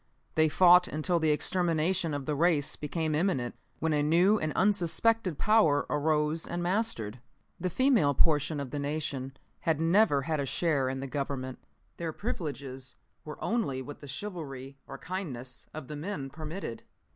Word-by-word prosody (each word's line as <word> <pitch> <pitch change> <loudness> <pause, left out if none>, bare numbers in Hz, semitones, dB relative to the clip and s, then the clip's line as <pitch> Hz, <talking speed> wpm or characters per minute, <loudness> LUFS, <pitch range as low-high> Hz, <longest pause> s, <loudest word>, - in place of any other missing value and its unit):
They 155 0 +4
fought 180 +2 +6
until 170 +3 0
the 160 -1 +2
extermination 170 +1 +1
of 140 -2 -4
the 150 - -1
race 150 -1 +2
became 155 +1 -2
imminent, 150 -7 0 0.2
when 160 0 0
a 150 - +2
new 175 +8 +4
and 155 -1 -1
unsuspected 200 -1 +2
power 210 -10 +4
arose 150 +1 +1
and 175 0 -3
mastered. 175 - -1 0.4
"The 185 +1 -1
female 230 - +3
portion 150 0 +2
of 140 -3 -5
the 145 - -3
nation 140 -2 -3 0.2
had 160 -2 0
never 165 -4 +4
had 155 0 -1
a 140 - 0
share 140 -4 +1
in 130 0 -3
the 135 - -4
Government. 135 -2 -4 0.4
Their 165 -2 -3
privileges 135 - -5 0.3
were 150 - -7
only 170 - -1
what 145 +2 -9
the 145 - -10
chivalry 140 -5 -6
or 135 - -7
kindness 135 -9 -6
of 155 -4 -8
the 150 - -6
men 145 -4 -5
permitted. 155 -3 -6
155 Hz, 160 wpm, -29 LUFS, 140-175 Hz, 0.4 s, fought